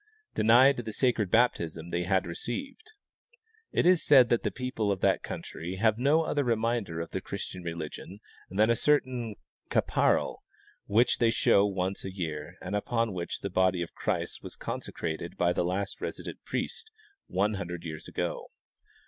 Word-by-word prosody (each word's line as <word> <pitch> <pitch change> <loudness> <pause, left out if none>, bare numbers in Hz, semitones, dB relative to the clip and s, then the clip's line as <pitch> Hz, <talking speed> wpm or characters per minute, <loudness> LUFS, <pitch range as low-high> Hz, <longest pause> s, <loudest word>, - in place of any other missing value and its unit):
denied 125 +5 +6
the 115 -2 -4
sacred 115 -4 +1
baptism 85 -8 +1
the.y 85 0 -1
had 95 -1 +2
received. 275 - -6 0.8
It - - +1
is 180 -1 +5
said 130 -5 +7
that 120 - +3
the - - 0
people 125 -5 -2
of 95 - -2
that - - +3
country 85 +3 -6
have 110 +3 +2
no 150 +5 +4
other 145 -2 0
reminder 115 -7 0
of 85 - -5
the - - -3
Christian 90 - -6
religion 85 +3 -6 0.3
than 105 +4 +3
a - - +4
certain 125 -5 +1 0.3
capa - - +3
ral - - -4 0.5
which 115 +4 +3
they 115 - +4
show 105 -3 +4
once 95 0 -2
a 95 - -5
year 80 -3 -5
and 95 +3 -3
upon 115 +1 0
which 85 -2 -4
the 100 - -4
body 90 -1 +2
of 85 - -9
Christ - - -2
was - - -9
consecrated 80 +1 -5
by 90 0 +2
the - - 0
last 95 +3 -2
resident - - -6
priest, 440 - -4 0.4
one 105 +3 +1
hundred 90 -4 -5
years 80 -2 -7
ago. - - -3
100 Hz, 165 wpm, -29 LUFS, 90-120 Hz, 0.8 s, said